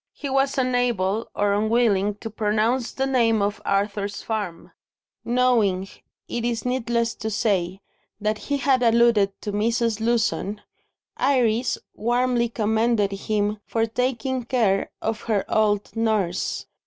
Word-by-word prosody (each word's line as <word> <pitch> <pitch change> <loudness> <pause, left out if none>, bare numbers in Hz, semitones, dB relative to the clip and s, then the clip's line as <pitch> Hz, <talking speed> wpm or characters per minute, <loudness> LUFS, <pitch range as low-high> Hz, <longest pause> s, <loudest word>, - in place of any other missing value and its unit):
He 280 - -6
was 270 +1 +1
unable, 240 -5 0
or 205 0 +2
unwilling, 210 -2 +2
to 225 - -6
pronounce 220 +4 0
the 270 - -1
name 235 -4 +2
of 205 +1 -1
Arthur's 200 0 -1
farm. 205 -7 -4 0.5
Knowing, 235 -6 +2 0.4
it 235 - -3
is 235 0 -2
needless 235 -2 0
to 220 - -5
say, 195 -4 0 0.4
that 215 0 -1
he 285 - +2
had 270 -2 +2
alluded 230 -4 +3
to 210 - -4
Mrs. 230 +1 0
Lewson, 220 -3 0 0.6
Iris 250 -3 +2 0.2
warmly 240 +1 +1
commended 220 -1 +1
him 210 +1 -1
for 225 -1 +1
taking 250 +2 -1
care 225 -6 +1
of 220 -1 -2
her 205 -3 +1
old 210 -1 +1
nurse. 215 -6 -1
225 Hz, 130 wpm, -23 LUFS, 205-240 Hz, 0.6 s, alluded